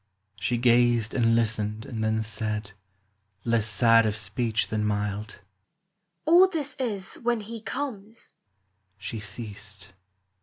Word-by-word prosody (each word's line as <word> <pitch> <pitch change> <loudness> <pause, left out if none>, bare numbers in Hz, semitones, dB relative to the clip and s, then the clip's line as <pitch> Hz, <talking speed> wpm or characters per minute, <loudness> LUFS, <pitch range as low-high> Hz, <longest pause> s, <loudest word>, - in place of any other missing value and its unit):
She 120 +4 0
gazed 120 -2 +3
and 115 -2 +3
listened 110 -1 0
and 110 -3 -4
then 110 0 +1
said, 105 -1 -3 0.7
Less 115 -2 +2
sad 115 +2 +5
of 105 - -1
speech 110 +2 -1
than 110 -1 -1
mild, 105 0 -2 0.2
— 185 - -52
" 175 -2 -51
All 350 +4 +7
this 315 -6 -3
is 205 -7 -3
when 240 -1 +1
he 225 +2 -7
comes." 225 -3 -6 0.6
She 110 - -5
ceased. 105 -2 -7
115 Hz, 130 wpm, -27 LUFS, -, 0.7 s, All